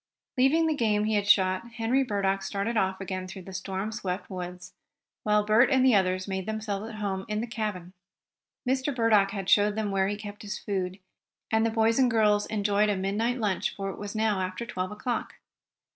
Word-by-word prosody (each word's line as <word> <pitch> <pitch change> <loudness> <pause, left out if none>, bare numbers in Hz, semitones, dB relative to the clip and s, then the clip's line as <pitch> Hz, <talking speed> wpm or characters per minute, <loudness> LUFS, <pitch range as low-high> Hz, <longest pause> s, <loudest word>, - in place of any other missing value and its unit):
Leaving 280 +5 +4
the 320 - +2
game 215 -6 +1
he 215 +1 0
had 205 -1 +1
shot, 190 +4 +3
Henry 240 +3 +1
Burdock 195 -4 0
started 200 +4 -2
off 190 -2 +1
again 185 -1 -4
through 190 0 -9
the 190 - -10
storm 190 +2 -3
swept 195 -3 -4
woods, 180 -1 -7 0.5
while 210 0 +2
Bert 220 +4 +5
and 260 -2 +4
the 260 - +6
others 185 -1 +2
made 190 0 -3
themselves 215 -1 -3
at 225 - -8
home 195 -2 -3
in 210 0 -2
the 230 - -1
cabin. 210 -6 -4 0.7
Mr. 265 +2 0
Burdock 220 -4 +4
had 195 -2 -5
showed 205 +1 +4
them 215 -2 -1
where 195 -1 +2
he 205 +1 -2
kept 205 0 -9
his 210 0 -5
food, 190 -2 -3 0.5
and 220 0 +3
the 230 - +2
boys 225 +2 +2
and 255 -2 +5
girls 210 -2 +3
enjoyed 205 0 +1
a 205 - +1
midnight 210 +6 0
lunch, 205 -4 -1
for 195 -1 -3
it - - -10
was 205 +1 -6
now 215 -3 +1
after 185 +5 -3
twelve 185 -6 -3
o'clock. 235 +3 -3
210 Hz, 205 wpm, -27 LUFS, 190-225 Hz, 0.7 s, the